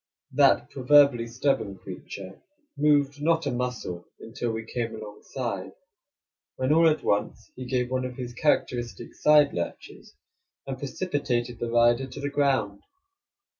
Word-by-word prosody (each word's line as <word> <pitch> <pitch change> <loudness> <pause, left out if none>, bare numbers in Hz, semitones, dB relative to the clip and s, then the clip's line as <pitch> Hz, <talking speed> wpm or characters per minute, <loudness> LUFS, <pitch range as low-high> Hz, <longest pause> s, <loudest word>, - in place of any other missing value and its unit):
That - - +3
proverbially 135 -3 +4
stubborn 115 -5 -1
creature 95 0 -9 0.3
moved 145 -1 +2
not 165 +1 +2
a 140 - 0
muscle 120 -8 -4
until 120 +1 -4
we 110 0 -5
came 115 0 -3
alongside, 105 -1 -6 0.8
when 130 +3 +1
all 165 +1 +6
at 155 - -1
once 105 +2 -1
he 130 - -7
gave 125 -1 -1
one 130 0 0
of 125 -1 -6
his 125 -1 -6
characteristic 120 -3 -1
side 150 -1 +5
lurches, 85 -1 -6 0.5
and 135 -1 -5
precipitated 130 -6 -2
the 120 - -2
rider 120 +2 +3
to 130 - -9
the 145 0 -3
ground. 130 -9 +1
125 Hz, 135 wpm, -26 LUFS, 115-140 Hz, 0.8 s, all